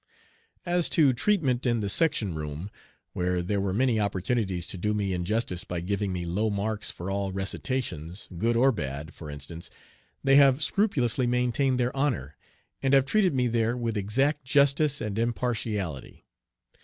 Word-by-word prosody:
As 175 -1 +1
to 145 -5 +5
treatment 135 - +1
in 120 -2 +1
the 100 - -1
section 110 - +1
room, 75 +5 -5 0.4
where 90 0 0
there 100 +2 -1
were 95 -1 -1
many 120 +2 +2
opportunities 95 -2 -1
to - - -5
do 105 +3 0
me 100 -2 -1
injustice 90 +1 -1
by 90 - -4
giving 100 +2 -2
me 90 -1 -3
low 100 +6 0
marks 105 +1 -2
for 90 +3 -5
all 100 0 -1
recitations, 95 - -3
good 115 +7 +1
or 130 +3 +5
bad, 75 - -5
for 75 - -9
instance, 80 +4 -7 0.5
they 135 0 +5
have 140 0 +5
scrupulously 130 - +1
maintained 125 +2 +1
their 125 +2 0
honor, 125 - -1 0.5
and 135 0 +3
have 135 -1 +5
treated 185 0 +2
me 125 -1 +2
there 115 0 +1
with 115 -2 -2
exact 135 +9 0
justice 140 +1 +3
and 105 -1 -3
impartiality. 110 - -3
110 Hz, 160 wpm, -27 LUFS, 95-130 Hz, 0.5 s, to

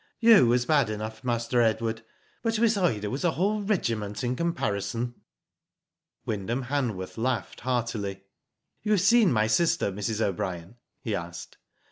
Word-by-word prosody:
"You 225 - +7
was 120 +1 +2
bad 145 -4 +3
enough. 110 +2 -5
Master 120 0 +1
Edward, 115 0 0 0.4
but 225 -1 0
Miss 225 0 +3
Ida 110 - 0
was 135 +6 -3
a 170 -2 +2
whole 205 +4 0
regiment 115 - -1
in 125 +1 0
comparison." 120 - -2 1.1
Wyndham 110 +5 -2
Hanworth 120 -8 -3
laughed 125 0 -2
heartily. 115 -6 -2 0.6
"You 215 - +1
have 200 - +3
seen 215 -1 +5
my 110 -2 +3
sister, 165 +1 +2
Mrs. 105 +3 -3
O'Brien?" 95 -1 -3 0.3
he 110 - -2
asked. 85 -3 -6
120 Hz, 140 wpm, -27 LUFS, 105-165 Hz, 1.1 s, You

